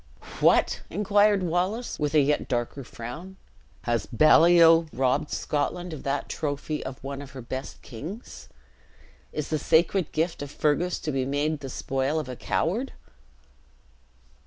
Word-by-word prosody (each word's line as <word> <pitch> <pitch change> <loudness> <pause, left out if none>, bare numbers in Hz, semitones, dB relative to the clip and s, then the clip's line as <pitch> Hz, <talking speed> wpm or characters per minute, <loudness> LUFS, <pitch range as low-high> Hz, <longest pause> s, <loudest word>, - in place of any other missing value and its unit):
"What!" - - +3
inquired 205 -1 +3
Wallace, 180 +8 -1
with 150 0 -1
a 150 - +7
yet 145 +1 +1
darker 120 +3 -2
frown, 125 +12 -8 0.5
"has 120 -1 -1
Baliol 165 +4 +6
robbed 130 +2 0
Scotland 170 +4 -2
of 150 - -7
that 140 0 -2
trophy 150 0 -3
of 130 -1 -6
one 140 0 -5
of 140 -1 -11
her - - -6
best 130 +3 -6
kings? 165 - -9 0.8
Is 150 -2 -4
the 155 - 0
sacred 170 +3 +2
gift 165 +1 -1
of 145 - -5
Fergus 155 +5 0
to 155 - -2
be 135 -2 0
made 145 +3 -1
the 135 -2 -7
spoil 135 +4 -1
of 155 - -5
a 125 - -6
coward?" 220 - -1
150 Hz, 145 wpm, -26 LUFS, 135-175 Hz, 0.8 s, a